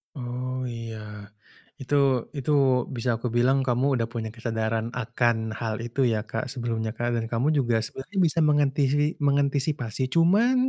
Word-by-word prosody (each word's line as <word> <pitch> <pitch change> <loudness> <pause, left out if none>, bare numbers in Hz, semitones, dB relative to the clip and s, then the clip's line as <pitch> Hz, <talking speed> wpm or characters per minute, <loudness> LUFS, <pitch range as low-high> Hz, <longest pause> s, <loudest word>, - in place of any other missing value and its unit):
Oh, 125 0 -4
iya. 115 -1 -6 0.8
Itu 135 -2 +2
itu 140 +2 -1 0.4
bisa 120 +1 -2
aku 120 - -3
bilang 130 +3 +4
kamu 130 +2 +2
sudah 115 - 0
punya 115 -2 -3
kesadaran 115 0 -2
akan 115 -2 0
hal 110 -2 -2
itu 120 +3 0
ya 110 -3 +1
Kak 115 +1 -4
sebelumnya 115 -3 -2
Kak, 120 0 -1
dan 115 - -2
kamu 120 +6 0
juga 120 -4 +2
sebenarnya 135 - -7
bisa 165 -1 +2
mengantisi 145 0 +2
mengantisipasi, 140 -3 0
cuman 195 +9 +4
125 Hz, 145 wpm, -26 LUFS, 115-140 Hz, 0.8 s, bilang